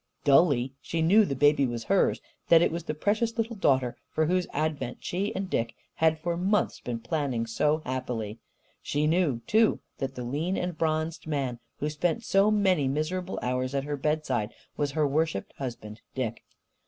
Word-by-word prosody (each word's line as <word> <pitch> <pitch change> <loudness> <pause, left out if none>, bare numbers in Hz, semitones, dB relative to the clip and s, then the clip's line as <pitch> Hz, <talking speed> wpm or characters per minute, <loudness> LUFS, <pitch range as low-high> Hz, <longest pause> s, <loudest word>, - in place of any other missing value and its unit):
Dully, 135 -3 +4
she 165 -1 -1
knew 205 +6 +6
the 140 - -2
baby 145 0 +4
was 120 -1 -4
hers, 195 -1 +2 0.3
that 165 0 +7
it - - +2
was 170 0 -4
the 155 - -3
precious 220 +7 0
little 230 0 -1
daughter 130 - +2
for 155 - +1
whose 180 +2 +1
advent 150 -4 -2
she 195 +4 -2
and 190 0 -2
Dick 115 -9 -1 0.2
had 160 0 +3
for 170 +2 -2
months 195 +5 +1
been 120 -2 -4
planning 135 -5 -1
so 150 +7 +1
happily. 120 -4 -3 0.4
She 145 +1 0
knew, 155 -7 +2
too, 220 - +3 0.2
that 135 0 -3
the 125 - -5
lean 150 +10 -1
and 180 -1 -2
bronzed 160 0 -1
man 135 -6 -2 0.2
who 150 - -2
spent 170 +9 -1
so 195 -1 +4
many 190 -9 +3
miserable 165 +7 -2
hours 130 +2 -1
at 135 - 0
her 145 +1 -2
bedside 135 -6 -1 0.2
was 145 -1 -1
her 155 0 +2
worshipped 150 -6 -1
husband, 115 -5 -6
Dick. 120 -4 -2
150 Hz, 180 wpm, -28 LUFS, 130-175 Hz, 0.4 s, that